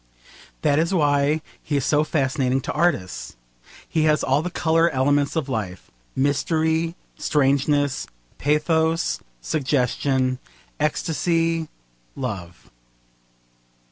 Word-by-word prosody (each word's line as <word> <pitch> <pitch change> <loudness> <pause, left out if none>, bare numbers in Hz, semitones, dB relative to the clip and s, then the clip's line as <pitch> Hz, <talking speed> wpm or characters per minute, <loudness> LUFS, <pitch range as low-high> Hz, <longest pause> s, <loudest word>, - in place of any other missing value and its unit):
That 145 -1 +3
is 170 +4 +1
why 145 -1 +2 0.2
he 145 - -1
is 140 - -1
so 150 0 +3
fascinating 135 -3 +1
to - - -3
artists. 150 - -1 0.5
He 155 -1 +1
has 155 -1 +3
all 135 +3 +2
the 180 - -3
colour 165 -1 +2
elements 140 +2 +1
of 160 -4 -1
life: 105 -8 -4 0.2
mystery, 160 +4 +1 0.2
strangeness, 140 0 +1 0.3
pathos, 160 +3 +1 0.2
suggestion, 130 - 0 0.4
ecstasy, 165 +1 0 0.5
love. 95 -10 -6
145 Hz, 100 wpm, -23 LUFS, 135-160 Hz, 0.5 s, That